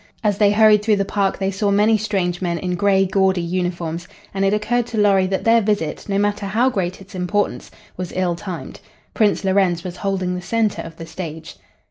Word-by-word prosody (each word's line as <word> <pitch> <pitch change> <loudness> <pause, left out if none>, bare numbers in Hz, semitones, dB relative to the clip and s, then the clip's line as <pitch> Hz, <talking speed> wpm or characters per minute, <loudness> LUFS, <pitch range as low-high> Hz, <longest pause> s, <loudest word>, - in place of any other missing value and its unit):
As 205 -2 +1
they 205 -2 +5
hurried 210 0 +5
through 210 0 +2
the 200 -1 0
park 195 -1 0
they 195 0 -1
saw 200 +2 -1
many 210 +2 +4
strange 195 -5 -1
men 170 -2 -1
in 180 +1 -3
gray, 195 +1 +3
gaudy 190 -1 +2
uniforms, 175 -1 -3 0.3
and 195 0 -1
it 195 - +3
occurred 230 +3 0
to 225 - -5
Lorry 195 -3 +4
that 190 0 -2
their 230 0 +4
visit, 205 -4 -2
no 195 - +1
matter 205 0 0
how 235 +6 +2
great 185 -5 -3
its 195 - -14
importance, 190 +3 -2 0.3
was 180 -1 -5
ill 185 -2 +1
timed. 180 -1 -7 0.3
Prince 210 -2 +2
Lorenz 190 -3 +2
was 180 -1 -6
holding 190 -2 -1
the 180 - -4
center 220 +2 0
of 165 0 -10
the 165 - -7
stage. 160 -2 -7
195 Hz, 205 wpm, -20 LUFS, 180-210 Hz, 0.3 s, they